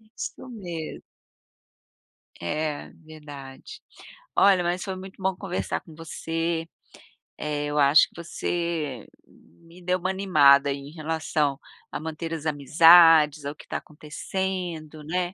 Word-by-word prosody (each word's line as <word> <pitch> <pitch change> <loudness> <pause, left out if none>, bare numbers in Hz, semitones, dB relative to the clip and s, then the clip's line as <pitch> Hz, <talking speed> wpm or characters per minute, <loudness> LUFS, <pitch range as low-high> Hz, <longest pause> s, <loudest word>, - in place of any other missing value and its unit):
isso 220 +3 -8
me 175 -9 -7 1.4
É, 150 - -3
verdade. 150 - -11 0.6
Olha, 195 -3 +5
mas 175 +2 -1
foi 190 -2 -4
muito 190 +1 -11
bom 190 0 0
conversar 185 -1 -3
com 160 - -15
você, 165 +1 -3 0.7
eh, 150 -1 -3
eu 145 0 -3
acho 140 +2 +6
que - - -29
você 165 -7 -3 0.2
me 165 - -20
deu 180 +1 0
uma 185 - -2
animada 145 -8 +5
em 140 +1 -6
relação 155 -3 -1 0.3
a - - -4
manter 160 +1 -5
as 160 -1 -5
amizades, 155 0 +6
ao 145 +1 -4
que - - -15
tá - - -3
acontecendo, 160 0 -5
né. 180 +3 -2
160 Hz, 125 wpm, -25 LUFS, 150-180 Hz, 1.4 s, acho